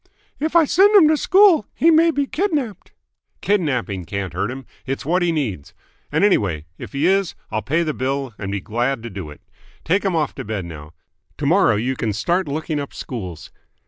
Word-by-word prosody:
"Well?" 305 - +1
"If 320 - -10
I 335 -2 +6
send 395 +8 +4
him 360 -7 +8
to - - +4
a - - +3
school, 375 - +5
he 335 - +4
may 330 +1 +5
be 285 -3 0
kidnapped." 290 - -2 0.5
"Kidnapping 125 - 0
can't 95 -1 -4
hurt 95 +4 -1
him. 130 0 -7 0.2
It's 135 +1 -3
what 180 +5 +1
he 175 -1 +2
needs. 115 - -3 0.4
And, - - +1
anyway, 95 - +2
if - - -9
he 140 +3 0
is 195 -1 +2 0.2
I'll 110 - -1
pay 155 +8 0
the 155 -2 -2
bill 135 -1 -2
and 95 -1 -4
be 100 -1 -3
glad 120 +2 -2
to 115 - -7
do 95 -5 -7
it. 75 - -13 0.4
Take 185 +5 +1
him 190 -3 0
off 155 -3 0
to 135 - -6
bed 105 -5 -4
now. 80 -2 -10 0.4
To 145 - -4
morrow 170 - +4
you 125 +5 -1
can 110 -4 -2
start 175 - 0
looking 155 +1 -2
up 140 - -6
schools. 95 - -7
140 Hz, 210 wpm, -21 LUFS, -, 0.5 s, him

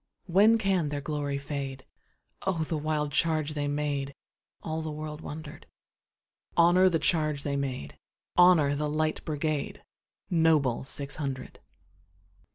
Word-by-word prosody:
When 200 +5 +5
can 190 -7 +1
their 145 0 -3
glory 145 -1 -2
fade?O 140 +5 -6
the 160 - -2
wild 150 -1 -1
charge 155 0 +1
they 145 -1 -2
made! 145 -1 -2 0.5
All 160 0 -3
the 160 - -4
world 150 0 -6
wonder'd. 150 -1 -8 0.9
Honor 175 +2 +6
the 170 - +2
charge 155 -3 0
they 140 -1 -1
made! 130 - -4 0.4
Honor 175 -5 +6
the 150 +1 -1
Light 155 +1 -1
Brigade, 155 -1 -2 0.4
Noble 160 -8 +2
six 140 +1 -3
hundred! 135 -4 -5
150 Hz, 125 wpm, -28 LUFS, 145-160 Hz, 0.9 s, Honor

